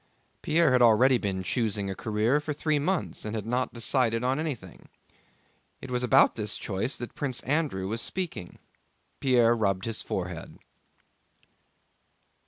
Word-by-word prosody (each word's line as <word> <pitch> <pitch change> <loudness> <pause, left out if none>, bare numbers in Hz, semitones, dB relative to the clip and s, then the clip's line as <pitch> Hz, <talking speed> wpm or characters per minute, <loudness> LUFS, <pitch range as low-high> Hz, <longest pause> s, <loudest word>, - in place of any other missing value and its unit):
Pierre 165 -2 +3
had 125 -1 +4
already 120 +2 +5
been 95 -3 -2
choosing 105 -1 -1
a 95 - -3
career 110 +7 0
for 150 0 -4
three 150 0 0
months, 180 +5 -2
and 105 +1 -4
had 105 -2 -4
not 125 +2 -1
decided 115 -1 +1
on 130 +3 +1
anything. 130 - -6 0.9
It 130 - -9
was 125 0 0
about 130 +2 +5
this 105 -2 -3
choice 105 +7 -3
that 120 - -7
Prince 135 -4 -2
Andrew 140 -10 -1
was 115 +3 -2
speaking. 175 - -4 0.6
Pierre 120 -3 +4
rubbed 100 -5 0
his 115 -1 -2
forehead. 90 -2 -5
120 Hz, 145 wpm, -27 LUFS, 105-135 Hz, 0.9 s, already